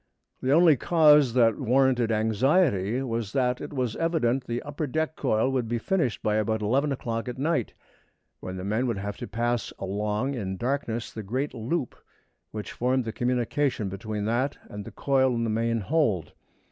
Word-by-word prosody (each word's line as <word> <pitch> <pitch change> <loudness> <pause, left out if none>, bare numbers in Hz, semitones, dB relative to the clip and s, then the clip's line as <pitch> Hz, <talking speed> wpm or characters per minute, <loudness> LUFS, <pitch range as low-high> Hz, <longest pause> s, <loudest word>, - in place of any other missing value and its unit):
The 130 - 0
only 165 0 +6
cause 150 -4 +5
that 115 0 +4
warranted 125 -2 +2
anxiety 110 - +2
was 115 -4 -3
that 125 -2 +1
it 145 - -6
was 125 -5 -2
evident 135 -7 +1
the 120 0 -2
upper 145 +1 -4
deck 160 +3 -1
coil 130 -1 +1
would 125 -3 -1
be 120 +1 -1
finished 130 -1 -1
by 105 0 +1
about 110 0 0
eleven 135 +7 +1
o'clock 115 -2 -3
at 125 - -6
night, 145 -3 -1 0.6
when 95 0 -6
the 90 - -5
men 110 +6 0
would 115 -4 -1
have 100 +1 -4
to - - -6
pass 120 +2 -1
along 105 +6 -2
in 95 -7 -4
darkness 120 -2 -2
the 110 - -5
great 130 +8 -3
loop 125 +4 -2 0.5
which 105 -1 -6
formed 125 +1 0
the 110 - -4
communication 125 -1 0
between 105 +1 -4
that 120 +6 0
and 105 -1 -7
the - - -8
coil 130 -2 +2
in 115 - -1
the 115 - 0
main 115 +1 0
hold. 110 - 0
120 Hz, 180 wpm, -26 LUFS, 110-135 Hz, 0.6 s, only